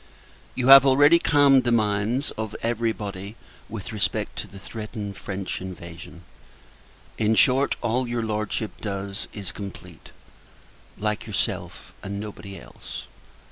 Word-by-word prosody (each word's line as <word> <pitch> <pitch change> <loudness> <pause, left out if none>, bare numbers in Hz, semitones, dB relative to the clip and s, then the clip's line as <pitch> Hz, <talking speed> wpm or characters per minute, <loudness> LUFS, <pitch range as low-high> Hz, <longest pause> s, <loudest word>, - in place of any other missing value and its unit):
You 130 0 +1
have 135 -1 +12
already 145 +5 +6
calmed 140 -4 +5
the 120 - +1
minds 110 +4 +1
of 110 -1 -5
every 115 0 +1
body 100 -1 -6 0.3
with 110 +1 -6
respect 100 -4 -1
to - - -5
the 100 - -13
threatened 105 0 -6
French 95 -1 -5
invasion. 85 -1 -9 1.0
In 110 0 +3
short, 135 +4 +4
all 120 +2 +1
your 120 -1 -1
Lordship 110 0 -2
does 100 -1 -4
is 100 -4 -6
complete; 100 0 -9 0.9
like 105 +1 -2
yourself, 105 - -3
and 100 0 -5
nobody 100 -2 -8
else. - - -9
110 Hz, 130 wpm, -25 LUFS, 100-120 Hz, 1.0 s, have